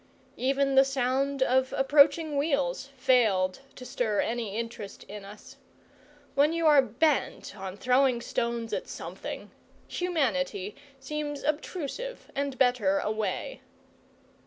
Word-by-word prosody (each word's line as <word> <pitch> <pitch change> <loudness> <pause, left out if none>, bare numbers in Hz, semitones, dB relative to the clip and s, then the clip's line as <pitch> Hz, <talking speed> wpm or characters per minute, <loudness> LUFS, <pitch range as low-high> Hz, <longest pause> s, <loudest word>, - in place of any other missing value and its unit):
Even 275 +2 +1
the 270 0 +7
sound 270 +1 0
of 260 0 +2
approaching 290 +3 +4
wheels 275 -2 0
failed 220 -8 +3 0.2
to 250 - -10
stir 220 -5 -1
any 225 -3 -2
interest 230 -3 -6
in 205 +1 -9
us. 210 +7 -12 0.8
When 290 +3 +3
you 335 0 0
are 295 -3 +7
bent 265 -2 0
on 190 -1 -7
throwing 250 +1 +3
stones 235 -1 -2
at - - -2
something, - - -7 0.4
humanity 210 - -1 0.2
seems 290 +1 -4
obtrusive 320 - -4
and 280 -1 -2
better 245 -7 +3
away. 215 - -2
260 Hz, 115 wpm, -28 LUFS, 225-280 Hz, 0.8 s, the